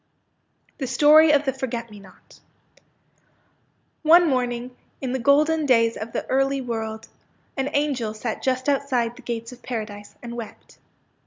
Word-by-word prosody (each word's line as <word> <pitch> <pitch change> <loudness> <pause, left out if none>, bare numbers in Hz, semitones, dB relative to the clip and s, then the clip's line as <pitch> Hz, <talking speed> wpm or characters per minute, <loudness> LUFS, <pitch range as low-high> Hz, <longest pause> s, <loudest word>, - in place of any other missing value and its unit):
THE 265 - -3
STORY 300 +4 +6
OP 290 -1 +3
THE 265 - 0
FORGET 235 -3 -5
ME 210 - -11
NOT 190 -2 -18 1.6
One 335 +2 +6
morning, 250 -2 -2 0.2
in 260 -2 -3
the 260 - -1
golden 300 +4 +3
days 230 -3 +3
of 220 +1 -6
the - - -3
early 270 +1 +1
world, 225 -3 -5 0.5
an 270 0 -1
angel 260 -7 -1
sat 220 +1 -4
just 255 0 -1
outside 260 -4 0
the - - -13
gates 230 0 -5
of 250 - -13
Paradise, 215 -4 -6
and 235 0 -7
wept. 230 -3 -10
250 Hz, 150 wpm, -23 LUFS, 230-280 Hz, 1.6 s, STORY